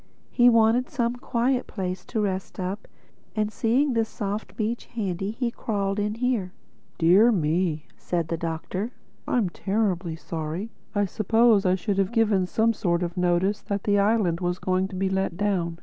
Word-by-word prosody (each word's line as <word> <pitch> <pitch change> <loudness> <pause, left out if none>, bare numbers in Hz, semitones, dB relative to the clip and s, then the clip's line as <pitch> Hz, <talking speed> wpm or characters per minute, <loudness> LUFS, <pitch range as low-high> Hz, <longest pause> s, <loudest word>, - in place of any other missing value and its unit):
He 245 -1 +6
wanted 230 +3 +4
some 240 -6 -1
quiet 245 +1 0
place 185 -2 -4
to 225 - -3
rest 190 -2 -3
up; 190 +3 -4 0.5
and 215 -1 0
seeing 255 +6 +1
this 225 -1 +1
soft 205 -1 -4
beach 225 +2 -2
handy 195 -4 -3
he 235 +2 -2
crawled 200 -3 -2
in 210 +1 -1
here." 230 -6 -1 0.4
"Dear 185 +8 +6
me!" 160 -3 0
said 170 -3 -2
the 165 - 0
Doctor. 170 +7 -4 0.3
"I'm 225 -7 +1
terribly 190 -3 -1
sorry. 165 +6 -5 0.2
I 205 0 +3
suppose 215 +1 +3
I 185 - +4
should 195 +1 -1
have 195 +1 +1
given 210 -5 +2
some 225 +4 +2
sort 175 -5 0
of 170 0 -4
notice 180 +3 +1
that 200 -1 -3
the 205 -1 +3
island 200 -5 +2
was 175 -1 -1
going 185 +1 0
to 190 - -9
be 190 +1 0
let 190 -2 -1
down. 180 -5 0
200 Hz, 170 wpm, -25 LUFS, 180-225 Hz, 0.5 s, He